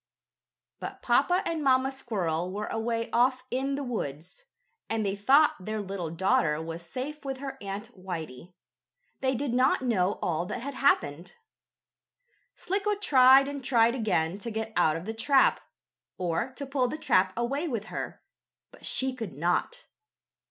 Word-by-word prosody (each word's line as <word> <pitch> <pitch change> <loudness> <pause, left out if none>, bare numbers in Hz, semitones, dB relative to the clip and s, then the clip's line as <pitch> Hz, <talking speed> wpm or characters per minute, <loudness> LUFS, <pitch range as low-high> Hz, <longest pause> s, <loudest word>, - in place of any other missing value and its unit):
But - - -7
Papa 360 +1 +3
and 325 -2 -2
Mamma 265 0 +3
Squirrel 185 -10 -2
were 210 +2 -3
away 230 0 -2
off 255 +1 +2
in 270 +2 -1
the 285 - -3
woods, 180 - -5 0.4
and 220 -1 0
they 195 0 0
thought 275 +9 +4
their 215 +2 -3
little 195 -4 -4
daughter 170 -2 +1
was 165 +1 -6
safe 260 - -6
with 270 -1 -4
her 270 0 -6
Aunt 205 +4 -6
Whitey. 175 -3 -7 0.6
They 260 0 +1
did 265 0 -2
not 260 +1 +3
know 200 -6 +2
all 170 +1 -2
that 240 - -5
had 280 +1 -4
happened. 175 - +1 1.2
Slicko 405 +2 -1
tried 270 -8 +6
and 280 -1 -5
tried 235 -2 +4
again 200 -7 0
to 235 - -5
get 220 0 -4
out 160 -3 +3
of 165 +2 -5
the 220 - -3
trap, 265 +5 +3 0.6
or 180 +7 -1
to 280 - -6
pull 270 -2 0
the 305 - -4
trap 185 -10 +2
away 275 +7 -1
with 235 -8 -2
her, - - -5 0.5
but - - -18
she 260 0 -1
could 225 - -6
not. 175 - -1
230 Hz, 160 wpm, -28 LUFS, 185-270 Hz, 1.2 s, tried